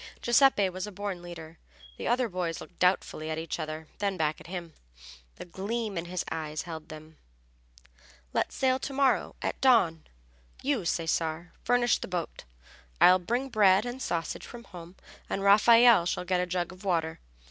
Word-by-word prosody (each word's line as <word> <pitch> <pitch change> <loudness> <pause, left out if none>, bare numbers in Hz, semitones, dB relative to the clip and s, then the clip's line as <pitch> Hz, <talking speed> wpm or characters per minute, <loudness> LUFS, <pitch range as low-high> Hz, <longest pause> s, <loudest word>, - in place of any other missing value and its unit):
Giuseppe 240 -4 +4
was 185 +2 -5
a - - -7
born 200 -2 -5
leader. 165 -2 -10 0.4
The - - -4
other 245 +1 +2
boys 180 -4 -3
looked 180 - -13
doubtfully 180 -3 +1
at 155 - -2
each 165 +1 -4
other, 155 0 -5
then 200 -2 -1
back 155 -2 -1
at - - -13
him. 170 -2 -6 0.6
The - - -9
gleam 205 +4 -4
in 170 0 -3
his 180 0 -4
eyes 155 -1 -4
held 160 -3 -8
them. 155 0 -11 1.2
"Let's - - -1
sail 260 0 +2
to 275 - -5
morrow 270 -1 +1
at - - -3
dawn! 185 -12 +3 0.6
You, 265 -8 0
Cesare, 165 0 -1
furnish 245 -1 +2
the - - -6
boat, 175 - -5 0.5
I'll 185 +1 +7
bring 240 +9 -2
bread 205 -2 +4
and 245 +2 -5
sausage 165 -8 -3
from 240 -1 -10
home, 175 -3 -12 0.3
and 195 - -2
Raffaelle 225 -1 +6
shall 180 - -2
get 180 0 +1
a 180 - -2
jug 175 -1 -2
of 185 +2 -14
water. 165 -4 -1
180 Hz, 170 wpm, -28 LUFS, 165-225 Hz, 1.2 s, I'll